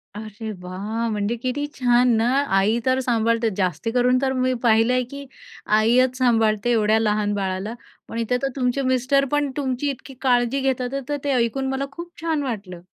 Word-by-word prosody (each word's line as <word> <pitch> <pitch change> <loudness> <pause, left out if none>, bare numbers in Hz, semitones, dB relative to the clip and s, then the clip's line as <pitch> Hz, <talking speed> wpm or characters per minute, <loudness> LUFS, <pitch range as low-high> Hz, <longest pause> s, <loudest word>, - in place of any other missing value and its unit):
अरे, 215 +1 -7
वाह! 205 +6 -4
म्हणजे 210 +1 -1
किती 255 +4 -2
छान 245 -1 +3
ना! 225 +1 +2 0.3
आई 210 +4 +2
तर 260 0 +2
सांभाळते 230 -2 +1
जास्त 185 0 -1
करून 250 +1 +3
तर 265 -1 +1
मी 255 0 +1
पाहिलं 225 +1 +4
आहे 255 0 +2
की 280 0 -7 0.5
आईच 250 +3 +3
सांभाळते 225 -3 +2
एवढ्या 220 -1 +3
लहान 210 -1 +1
बाळाला, 195 +1 -3 0.3
पण 230 - -7
इथं 230 +2 0
तर 275 - 0
तुमचे 255 0 0
मिस्टर 260 +1 +2
पण 290 -1 +1
तुमची 270 0 -1
इतकी 270 0 -7
काळजी 245 0 +2
घेतात. 260 -2 0 0.2
तर 290 - 0
ते 285 - 0
ऐकून 255 +2 0
मला 265 +1 -2
खूप 340 +4 -9
छान 320 -3 -1
वाटलं. 200 -9 -5
245 Hz, 175 wpm, -22 LUFS, 220-265 Hz, 0.5 s, पाहिलं